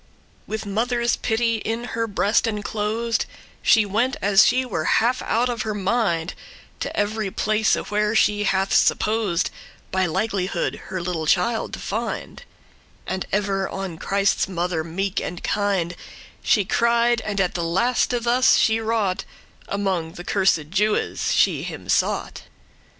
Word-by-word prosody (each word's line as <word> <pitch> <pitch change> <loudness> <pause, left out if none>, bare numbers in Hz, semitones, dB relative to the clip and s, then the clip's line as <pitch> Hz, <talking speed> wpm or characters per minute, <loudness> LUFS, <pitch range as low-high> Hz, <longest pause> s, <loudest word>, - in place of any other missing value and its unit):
With 220 0 -4
mother's 235 +4 0
pity 230 0 0
in 225 +2 -3
her 230 0 -1
breast 205 +2 +1
enclosed, 220 +2 -1 0.3
She 220 -2 +5
went, 240 +8 0
as 200 -3 +5
she 255 +1 +2
were 170 -10 -3
half 245 +3 +1
out 235 +2 +1
of 240 -3 -2
her 215 -1 -2
mind, 195 -5 0 0.5
To - - -4
every 210 0 0
place, 215 +2 +1
where 210 +1 -1
she 205 -1 +3
hath 195 0 +1
supposed 210 -6 +2 0.4
By 190 -1 +1
likelihood 190 +1 -2
her 185 -2 -4
little 170 -3 -3
child 220 +8 +1
to - - -5
find: 225 +2 -4 0.6
And 190 0 -3
ever 195 -1 0
on 190 -4 -5
Christ's 200 0 +1
mother 175 -2 -1
meek 190 +4 -2
and 175 - -6
kind 195 -4 0 0.5
She 205 -3 +2
cried, 235 +2 +2
and 205 -2 -3
at 180 -2 +1
the 170 - -2
laste 225 +9 +1
thus 245 +2 +4
she 220 0 +3
wrought, 220 -4 0 0.4
Among 190 -5 -2
the 175 - -8
cursed 180 -6 +1
Jewes 210 +2 0
she - - +3
him - - -7
sought. - - 0
205 Hz, 145 wpm, -23 LUFS, 190-225 Hz, 0.6 s, She